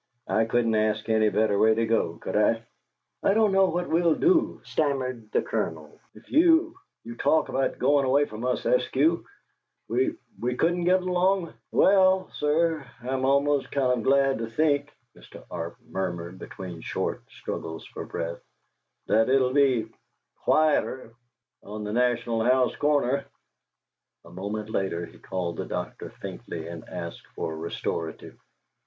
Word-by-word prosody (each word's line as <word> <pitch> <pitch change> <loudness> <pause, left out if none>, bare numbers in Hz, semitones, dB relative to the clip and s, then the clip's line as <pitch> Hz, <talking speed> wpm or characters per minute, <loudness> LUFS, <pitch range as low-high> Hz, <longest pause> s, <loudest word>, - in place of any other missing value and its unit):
I 110 - +2
couldn't 115 0 +1
ask 110 0 +1
any 110 -1 +4
better 105 -1 +1
way 110 0 +5
to 115 +1 +1
go, 110 -7 0
could - - -5
I?" 115 +2 +3 0.6
"I 195 - +3
don't 220 -2 +4
know 195 0 +5
what 175 0 -2
we'll 165 0 +3
do," 350 -2 +2
stammered 130 -7 -2
the - - +1
Colonel, 80 -2 -4 0.2
"if 105 - -17
you 330 +1 +5 0.3
you 115 - -8
talk 160 +6 +2
about 135 0 0
goin' 145 -1 +3
away 140 +2 +3
from 110 -1 -8
us, 125 0 0
Eskew. - - +2 0.6
We 365 -4 +1 0.2
we 125 +1 -1
couldn't 175 +4 +1
get 185 +1 +3
along 180 0 +1
" - - -53
"Well, 190 -1 +4
sir, 155 +1 +1 0.2
I'm 130 +1 -1
almost 140 +1 +2
kind 125 -3 +1
of - - -5
glad 135 -1 +3
to 115 - -3
think," 145 +4 +1 0.2
Mr. - - -14
Arp 85 +4 -5
murmured, 90 -3 -4
between 90 -3 -8
short - - -3
struggles 80 0 -6
for - - -7
breath, 85 0 -5 0.6
"that 110 +2 +3
it 135 +1 +5
'll 130 -1 +1
be 135 -5 +3 0.6
quieter 150 -6 +2 0.5
on 105 +1 -7
the 105 0 -4
"National 120 -2 +1
House" 125 +1 +3
corner!" 140 -2 +1 1.0
A 85 - -14
moment 105 +4 -5
later 90 -5 -1
he - - -16
called 90 -3 -4
the - - -3
doctor - - -5
faintly - - -7
and - - -9
asked - - -7
for 80 - -3
a - - -6
restorative. 80 0 -5
125 Hz, 155 wpm, -26 LUFS, 110-155 Hz, 1.0 s, way